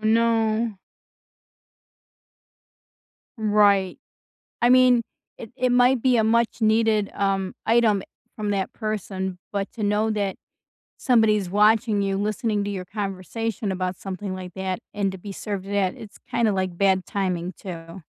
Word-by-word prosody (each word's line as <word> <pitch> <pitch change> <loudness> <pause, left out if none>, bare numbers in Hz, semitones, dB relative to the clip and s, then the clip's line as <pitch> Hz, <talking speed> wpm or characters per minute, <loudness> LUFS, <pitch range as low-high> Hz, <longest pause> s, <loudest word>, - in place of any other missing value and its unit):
no. 225 -1 +1 2.6
Right, 205 -3 +3 0.6
I 240 - +4
mean, 250 -1 +6 0.4
it 225 - -9
it 255 0 +1
might 245 0 +4
be 255 -2 +4
a 220 - +3
much 235 +1 +1
needed, 220 -1 +2
um, 195 -1 -1
item 225 -4 +3 0.3
from 210 -1 -2
that 195 -2 -1
person, 190 -4 -4
but 200 -1 -3
to 225 - -6
know 210 +2 +1
that 205 -3 -1 0.6
somebody's 215 -7 +3
watching 210 +1 +3
you, 195 -1 0
listening 210 +1 -1
to - - -3
your 190 -2 -4
conversation 205 +2 -4
about 185 0 -2
something 195 0 -5
like 185 -1 -8
that, 190 -1 -3 0.2
and 200 -1 0
to 190 - -8
be 200 +2 -8
served 195 -1 -5
that, 195 -2 0
it's 215 -1 -12
kinda 235 -3 +2
like 185 -3 -2
bad 190 -1 +2
timing 185 -2 -2
too. 170 -1 -9
205 Hz, 140 wpm, -24 LUFS, 190-225 Hz, 2.6 s, mean